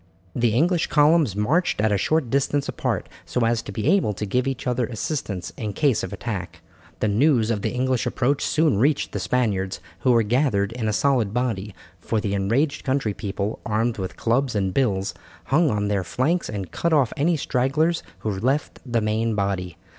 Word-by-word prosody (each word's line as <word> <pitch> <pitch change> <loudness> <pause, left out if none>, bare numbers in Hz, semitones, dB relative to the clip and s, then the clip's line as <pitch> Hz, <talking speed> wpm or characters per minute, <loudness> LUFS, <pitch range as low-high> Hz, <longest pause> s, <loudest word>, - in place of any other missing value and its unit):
The 120 -2 +2
English 170 +5 +2
columns 150 - +4
marched 140 - +1
at 110 0 +2
a 100 - +3
short 155 0 +1
distance 140 +1 +1
apart - - -2 0.2
so 125 - -2
as 115 0 +1
to - - -8
be 105 +5 -3
able 175 - +3
to 105 - -4
give 125 +6 0
each 135 -1 -3
other 125 -2 0
assistance 110 - -4
in 105 -3 -4
case 140 -4 +2
of 95 - -5
attack. 100 -1 -5 0.4
The - - +2
news 115 +1 +3
of 105 -3 -1
the - - 0
English 130 0 0
approach 130 +3 0
soon 155 -9 +2
reached 140 +4 +2
the - - -3
Spaniards, 100 -7 0 0.2
who 130 - +3
were 115 -2 +4
gathered 110 -3 +1
in 115 -2 -3
a - - +2
solid 120 -3 +1
body, 110 -6 -2 0.2
for 110 - -1
the 105 -2 -2
enraged 120 +10 0
country 130 -6 0
people, 100 +1 -3
armed 110 +1 0
with 95 -1 -5
clubs 125 +1 +1
and 95 -2 0
bills, 100 -8 0 0.3
hung 155 +3 +3
on 105 -3 0
their 100 -2 0
flanks 150 - 0
and 100 -5 -5
cut 170 -1 0
off 140 -6 +3
any 165 +4 +2
stragglers 150 +6 +1 0.2
who 105 -3 -2
left 135 +7 -1
the 120 -3 0
main 110 +1 0
body. 95 -3 -2
120 Hz, 190 wpm, -23 LUFS, 105-140 Hz, 0.4 s, columns